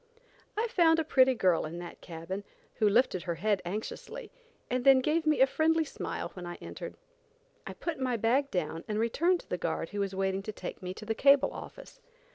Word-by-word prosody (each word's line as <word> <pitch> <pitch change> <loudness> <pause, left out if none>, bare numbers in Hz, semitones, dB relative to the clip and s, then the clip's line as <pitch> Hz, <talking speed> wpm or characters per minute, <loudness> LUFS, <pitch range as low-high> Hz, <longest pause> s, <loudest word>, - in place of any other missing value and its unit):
I 450 +2 +1
found 340 -8 +4
a 325 - +2
pretty 260 -3 +4
girl 185 -7 +3
in 160 +2 -5
that 175 0 -8
cabin, 175 +4 -6 0.3
who 215 - +4
lifted 205 -4 +3
her 170 -1 -3
head 200 +3 +1
anxiously, 415 - -6 0.4
and 250 0 -1
then 270 0 +8
gave 310 +5 +1
me 305 -3 +3
a - - +9
friendly 320 +3 +2
smile - - -5
when 180 - -8
I 175 - -5
entered. - - -8 0.7
I - - -5
put 335 -4 -4
my 255 -2 0
bag 255 +6 +2
down 165 - -2
and 210 - -2
returned 335 +11 +2
to - - -25
the 180 - -3
guard 165 0 -2
who 205 - -5
was 195 -1 -1
waiting 190 0 0
to 215 - -5
take - - -7
me 185 0 -5
to 215 - -9
the 225 - 0
cable 275 +4 +5
office. - - -10
225 Hz, 210 wpm, -30 LUFS, 185-300 Hz, 0.7 s, a